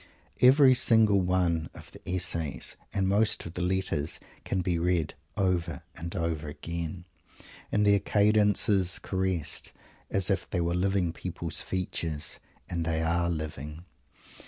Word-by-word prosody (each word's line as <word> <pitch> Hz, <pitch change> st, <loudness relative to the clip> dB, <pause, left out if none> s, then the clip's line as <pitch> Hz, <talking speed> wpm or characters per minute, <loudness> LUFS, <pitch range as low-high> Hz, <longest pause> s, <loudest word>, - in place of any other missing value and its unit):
Every 130 Hz, +1 st, +7 dB
single 110 Hz, -5 st, +4 dB
one 90 Hz, -3 st, +1 dB
of -, -, -12 dB
the -, -, -14 dB
"essays" 85 Hz, -5 st, -1 dB, 0.2 s
and 95 Hz, -1 st, 0 dB
most 105 Hz, +3 st, +2 dB
of 85 Hz, -, -7 dB
the 90 Hz, -, -4 dB
"letters" 90 Hz, -4 st, -1 dB, 0.2 s
can 95 Hz, -, -1 dB
be 85 Hz, -1 st, 0 dB
read 85 Hz, -2 st, +1 dB, 0.2 s
over 90 Hz, -4 st, 0 dB
and 85 Hz, +1 st, -5 dB
over 80 Hz, -3 st, -2 dB
again, 85 Hz, +3 st, -5 dB, 0.7 s
and 105 Hz, 0 st, +2 dB
their 100 Hz, 0 st, +5 dB
cadences 105 Hz, -3 st, +3 dB
caressed 95 Hz, -5 st, -2 dB, 0.4 s
as 95 Hz, 0 st, 0 dB
if 95 Hz, -, -1 dB
they 90 Hz, -, -1 dB
were 85 Hz, 0 st, 0 dB
living 90 Hz, -1 st, +1 dB
people's 85 Hz, -3 st, -4 dB
features. 85 Hz, -5 st, -3 dB, 0.3 s
And 85 Hz, -2 st, -2 dB
they 80 Hz, 0 st, 0 dB
are 85 Hz, +1 st, +1 dB
living. 75 Hz, 0 st, -5 dB
90 Hz, 135 wpm, -28 LUFS, 80-95 Hz, 0.7 s, Every